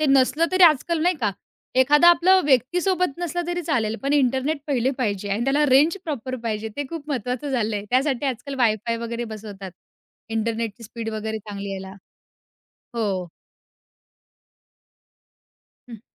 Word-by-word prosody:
ते 310 - +2
नसलं 275 +4 +4
तरी 370 0 +3
आजकाल 325 +1 +3
नाही 355 +2 +3
का 210 -3 +1 0.5
एखादा 295 +6 +6
आपलं 370 +2 +5
व्यक्तीसोबत 345 +5 +1
नसलं 350 0 -2
तरी 350 0 -2
चालेल, 230 -9 0
पण 275 +1 0
इंटरनेट 270 +2 +1
पहिले 260 -3 +1
पाहिजे 205 -5 -2
आणि 220 +4 -1
त्याला 280 +3 +2
रेंज 290 +6 +4
प्रॉपर 260 -4 -4
पाहिजे 220 -1 -3
ते 290 - -2
खूप 315 -3 -7
महत्वाचं 255 +1 -3
झालंय. 215 -5 -1
त्यासाठी 265 +1 +1
आजकाल 265 +2 -4
वाय-फाय 230 -1 +1
वगैरे 235 +1 -3
बसवतात, 200 -3 -8 0.6
इंटरनेटची 225 0 -2
स्पीड 225 +1 -6
वगैरे 220 0 -3
चांगली 200 -1 -7
यायला. 190 0 -7 1.0
हो. 195 -6 -2 2.6
हं. 230 -3 -10
255 Hz, 135 wpm, -23 LUFS, 220-295 Hz, 2.6 s, एखादा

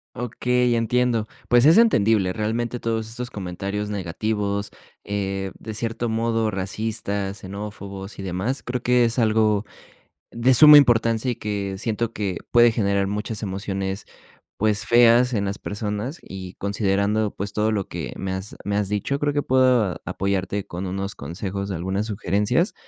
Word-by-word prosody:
Okey, 125 +1 0
entiendo. 115 -1 +1 0.2
Pues, 120 +1 +5
es 165 +8 +7
entendible, 110 - +3
realmente 115 +2 -2
todos 110 -1 -2
estos 120 +2 -6
comentarios 100 +2 -4
negativos, 100 +2 -2 0.3
eh, 95 -1 -3
de 110 - -7
cierto 115 +2 -3
modo, 115 -1 0
racistas, 100 0 -3
xenófobos, 100 0 -8
y - - -4
demás. 95 +8 -2
Creo 125 0 -4
que 125 -1 +4
es 115 +1 -1
algo 110 -2 +2 0.7
de 120 +3 +3
suma 150 +4 +11
importancia, 115 -3 +3
y 120 - -1
que 100 -3 -3
siento 115 +2 -2
que 100 -4 -2
puede 120 0 +6
generar 100 -3 0
muchas 105 +2 -4
emociones, 95 0 -3 0.5
pues, 105 -1 +1
feas 120 +1 +5
en 100 -2 0
las 100 0 -3
personas, 105 +8 -4
y 95 -1 -9
considerando, 100 +1 0
pues 100 +1 -5
todo 105 +1 +1
lo 100 -3 -1
que - - -6
me 95 -1 -4
has 95 +2 -5
me 100 - -2
has 105 -2 0
dicho, 105 +7 -2
creo 145 0 +1
que 145 0 0
puedo 125 -7 +2
apoyarte 100 +1 -2
con 90 +2 -5
unos 95 +2 -3
consejos 95 +6 -5
de 95 - -3
algunas 95 +5 -2
sugerencias. 105 - 0
105 Hz, 155 wpm, -23 LUFS, 100-115 Hz, 0.7 s, suma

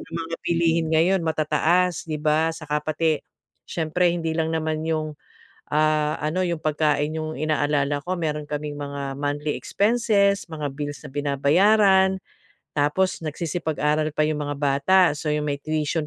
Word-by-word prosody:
ang 165 - -11
mga 165 0 -5
bilihin 165 -1 +2
ngayon 180 +4 +3
matataas, 160 +3 +1
'di 155 - -2
ba? 155 +1 +2
At - - -10
tsaka 150 0 -1
pati, 155 0 +1 0.5
siyempre 170 +2 0
hindi 165 -2 -2
lang 160 0 0
naman 160 0 -2
'yong, 155 -1 -1 0.6
ah, 155 0 +2
ano, 180 +5 0
'yong 170 -2 -3
pagkain 150 -1 +1
'yong 155 0 -4
inaalala 145 -2 +1
ko. 185 - -1
Meron 150 -3 -2
kaming 150 0 -4
mga 140 -1 -5
monthly 145 +1 -2
expenses, 205 -2 +2
mga 150 -3 -4
bills 145 -2 -6
na - - -8
binabayaran, 190 +7 +3 0.6
tapos 150 +6 +1
nagsisipag-aral 155 -1 -1
pa 155 - +1
yung 155 -1 -1
mga 145 0 -3
bata. 140 +6 +3 0.2
So, 150 -1 -2
'yong 150 0 -1
may 140 - 0
tuition 155 +1 -2
155 Hz, 155 wpm, -24 LUFS, 150-165 Hz, 0.6 s, ngayon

